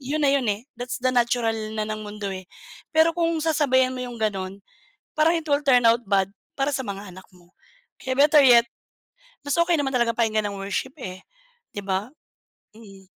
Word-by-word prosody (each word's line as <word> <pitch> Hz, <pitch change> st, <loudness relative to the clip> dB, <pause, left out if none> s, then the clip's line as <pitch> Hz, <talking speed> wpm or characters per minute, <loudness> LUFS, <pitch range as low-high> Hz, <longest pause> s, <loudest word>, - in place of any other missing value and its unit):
'yon 285 Hz, +4 st, -3 dB
na 285 Hz, -, +3 dB
'yon, 275 Hz, -1 st, +2 dB
eh. 220 Hz, +7 st, -9 dB
That's 245 Hz, +1 st, -5 dB
the 255 Hz, -, +1 dB
natural 235 Hz, -2 st, +1 dB, 0.2 s
na 215 Hz, -1 st, -3 dB
ng 215 Hz, 0 st, -5 dB
mundo, 205 Hz, -1 st, -6 dB
eh. 190 Hz, -1 st, -6 dB, 0.5 s
Pero 320 Hz, +1 st, +3 dB
kung 335 Hz, -1 st, +1 dB
sasabayan 260 Hz, -5 st, +2 dB
mo 250 Hz, -, -4 dB
'yong 240 Hz, -2 st, -8 dB
gano'n, 195 Hz, -2 st, -2 dB, 0.6 s
parang 315 Hz, +2 st, +4 dB
it 325 Hz, -2 st, -2 dB
will 285 Hz, +1 st, +2 dB
turn 250 Hz, -3 st, +5 dB
out 230 Hz, +1 st, +2 dB
bad 195 Hz, -1 st, +1 dB, 0.2 s
para 275 Hz, +1 st, -1 dB
sa 265 Hz, -3 st, -3 dB
mga 200 Hz, 0 st, -6 dB
anak 185 Hz, +1 st, -13 dB
mo. 175 Hz, 0 st, -22 dB, 0.4 s
Kaya 260 Hz, -, -3 dB
better 295 Hz, +1 st, +6 dB
yet, 240 Hz, -2 st, +7 dB, 0.8 s
mas 285 Hz, -, -1 dB
okay 340 Hz, 0 st, +3 dB
naman 275 Hz, -2 st, -1 dB
talaga 240 Hz, -2 st, +2 dB
pakinggan 220 Hz, -2 st, 0 dB
ang 200 Hz, -, -7 dB
worship, 200 Hz, +7 st, -3 dB
eh, 185 Hz, -7 st, -8 dB, 0.5 s
'di 205 Hz, -, -5 dB
ba? 195 Hz, +4 st, -2 dB, 0.7 s
Mm. 195 Hz, -4 st, -15 dB
240 Hz, 190 wpm, -24 LUFS, 205-280 Hz, 0.8 s, yet